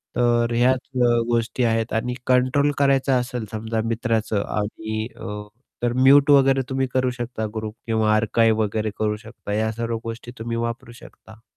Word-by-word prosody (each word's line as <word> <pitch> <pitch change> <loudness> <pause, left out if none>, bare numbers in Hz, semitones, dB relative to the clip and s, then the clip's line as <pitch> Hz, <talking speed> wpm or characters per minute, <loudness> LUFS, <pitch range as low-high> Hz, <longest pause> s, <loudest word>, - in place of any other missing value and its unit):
तर 120 -1 +2
ह्याच 125 +2 +2 0.2
अ, - - +5 0.2
गोष्टी 120 +2 0
आहेत 115 +1 -1
आणि 125 +1 -3
कंट्रोल 130 +3 +3
करायचं 135 -1 +3
असेल 125 -2 -4
समजा 110 +1 -2
मित्राचं 115 -3 0
आणि 110 +1 -3
अ, 105 0 -6 0.4
तर 120 0 +1
म्युट 135 +3 +5
वगैरे 135 -1 +5
तुम्ही 130 0 0
करू 130 -1 +2
शकता. 120 -2 -4
ग्रुप 110 -1 -4
किंवा 110 -1 +2
आर्काइव्ह 110 0 +2
वगैरे 110 +1 -2
करू 105 -1 0
शकता 110 -2 -8
या 110 +1 0
सर्व 115 +1 -3
गोष्टी 115 +1 -7
तुम्ही 115 +1 -3
वापरू 115 0 -4
शकता. 110 -2 -15
115 Hz, 160 wpm, -23 LUFS, 110-125 Hz, 0.4 s, अ